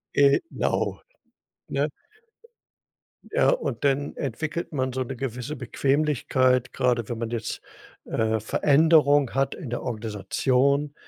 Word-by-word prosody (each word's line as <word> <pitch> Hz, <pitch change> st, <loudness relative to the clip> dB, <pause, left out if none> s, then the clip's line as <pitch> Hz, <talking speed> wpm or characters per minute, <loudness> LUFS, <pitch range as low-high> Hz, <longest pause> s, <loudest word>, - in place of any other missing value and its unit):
Genau, 140 Hz, -, +1 dB, 0.7 s
ne? -, -, 0 dB, 1.4 s
Ja, -, -, +3 dB
und -, -, -1 dB
dann 140 Hz, +1 st, +1 dB
entwickelt 155 Hz, +6 st, -3 dB
man 130 Hz, -3 st, -1 dB
so 130 Hz, -, -2 dB
'ne 130 Hz, +1 st, -6 dB
gewisse 125 Hz, +3 st, -4 dB
Bequemlichkeit, 130 Hz, -1 st, +1 dB
gerade 120 Hz, -3 st, 0 dB
wenn 120 Hz, -, -3 dB
man 115 Hz, 0 st, -4 dB
jetzt, 115 Hz, -2 st, -4 dB, 0.4 s
äh, 110 Hz, 0 st, 0 dB
Veränderung 145 Hz, +2 st, +4 dB
hat 135 Hz, 0 st, 0 dB
in 145 Hz, -10 st, -8 dB
der 120 Hz, -, -3 dB
Organisation, 125 Hz, +6 st, 0 dB
135 Hz, 115 wpm, -25 LUFS, 120-145 Hz, 1.4 s, Veränderung